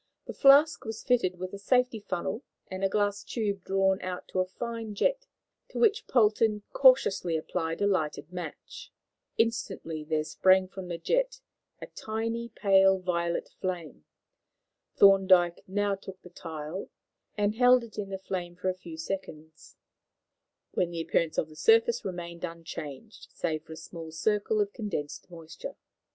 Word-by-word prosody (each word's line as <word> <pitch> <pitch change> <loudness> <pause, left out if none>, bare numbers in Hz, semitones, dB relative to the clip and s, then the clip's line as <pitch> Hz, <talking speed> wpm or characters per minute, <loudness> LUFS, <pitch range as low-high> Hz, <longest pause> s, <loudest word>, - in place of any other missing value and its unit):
The - - -6
flask 285 +2 +6
was 220 -2 -6
fitted 235 -8 +1
with 185 +1 -6
a 200 - -6
safety 250 +2 +2
funnel 190 +3 -3 0.3
and 185 +1 -4
a 195 - +3
glass 205 0 0
tube 200 -5 -2
drawn 195 0 +1
out 185 -1 -5
to 185 - -2
a 185 - +1
fine 225 +1 -5
jet, - - 0 0.4
to - - -8
which 440 -1 +3
Polton 215 -2 +3
cautiously 200 -10 +4
applied 160 +3 -3
a - - +4
lighted 175 -3 -1
match. 175 -3 -8 0.5
Instantly 195 -8 -1
there 155 0 0
sprang 185 +4 +3
from 190 -1 -8
the 170 -1 -4
jet - - 0 0.4
a - - -4
tiny, 230 +2 -4
pale 195 -3 +4
violet 170 -2 -2
flame. 170 - -5 0.9
Thorndyke 190 -3 +5
now 205 +1 0
took 190 -1 -8
the 180 - -13
tile, 160 +1 -6 0.5
and 205 0 +1
held 250 +1 +5
it 220 -2 -9
in 200 -1 -4
the 195 - -4
flame 180 -2 -5
for 180 +1 -2
a - - 0
few 170 -3 -10
seconds, 160 -3 -7 1.0
when 175 - 0
the 170 -1 -4
appearance 165 -1 0
of - - +1
the 155 - -15
surface 460 - +4
remained 170 -1 -6
unchanged 165 +2 -7
save 155 -2 -2
for 160 - -9
a - - -10
small 165 0 -9
circle 210 +5 0
of 205 0 -2
condensed 185 -11 -5
moisture. 165 -2 -9
190 Hz, 155 wpm, -29 LUFS, 170-220 Hz, 1.0 s, flask